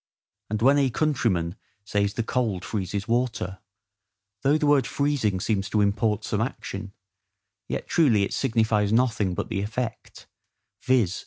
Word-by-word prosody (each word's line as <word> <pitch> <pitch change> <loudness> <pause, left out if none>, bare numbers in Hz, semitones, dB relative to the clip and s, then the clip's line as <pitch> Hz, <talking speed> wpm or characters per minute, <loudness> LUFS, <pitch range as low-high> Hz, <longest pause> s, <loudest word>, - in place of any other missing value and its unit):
And 110 +1 -2
when 140 +3 +5
a 135 -2 +3
countryman 110 - 0 0.3
says 100 0 0
the 115 - 0
cold 110 -6 -1
freezes 100 -1 -3
water, 115 -6 -1 0.8
though 145 +3 +3
the 155 - 0
word 145 -3 +4
freezing 140 -10 0
seems 100 +1 -1
to 105 - +2
import 105 +2 +1
some 110 -1 -1
action, 100 -4 -5 0.7
yet - - -4
truly 120 -12 +3
it 100 - -2
signifies 110 -5 +1
nothing 115 -6 +2
but - - -3
the 95 - -1
effect, 110 +3 -5 0.6
viz. 120 -8 +2
110 Hz, 145 wpm, -25 LUFS, 100-125 Hz, 0.8 s, when